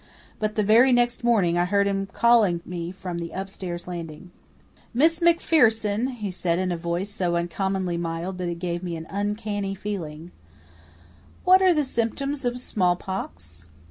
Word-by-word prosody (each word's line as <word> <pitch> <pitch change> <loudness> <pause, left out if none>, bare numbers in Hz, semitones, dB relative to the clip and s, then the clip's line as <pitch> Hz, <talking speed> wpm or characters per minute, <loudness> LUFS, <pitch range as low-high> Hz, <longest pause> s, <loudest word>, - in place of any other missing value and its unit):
But 215 0 -1
the 215 - +2
very 230 +6 +6
next 240 0 +2
morning 195 -8 +3
I 175 - +3
heard 200 +2 +2
him 195 0 -1
calling 210 -5 +3
me 175 -1 -5
from 180 -2 -6
the 170 0 -5
upstairs 185 -2 -5
landing. 170 0 -7 0.6
"Miss 320 +6 +4
MacPherson," 240 -10 +3
he 210 -4 -4
said 175 -2 -1
in 185 0 -1
a - - 0
voice 170 +4 -3
so 180 -4 -1
uncommonly 180 +1 -1
mild 170 +2 -4
that 180 -1 -2
it 170 - -3
gave 175 0 -3
me 175 -2 -4
an 160 0 -7
uncanny 205 0 -2
feeling, 175 -5 -6 1.1
"what 370 +1 +6
are 375 -1 +6
the 305 -3 +2
symptoms 275 +3 -2
of 245 0 -1
smallpox?" 175 - -3
195 Hz, 160 wpm, -25 LUFS, 175-225 Hz, 1.1 s, very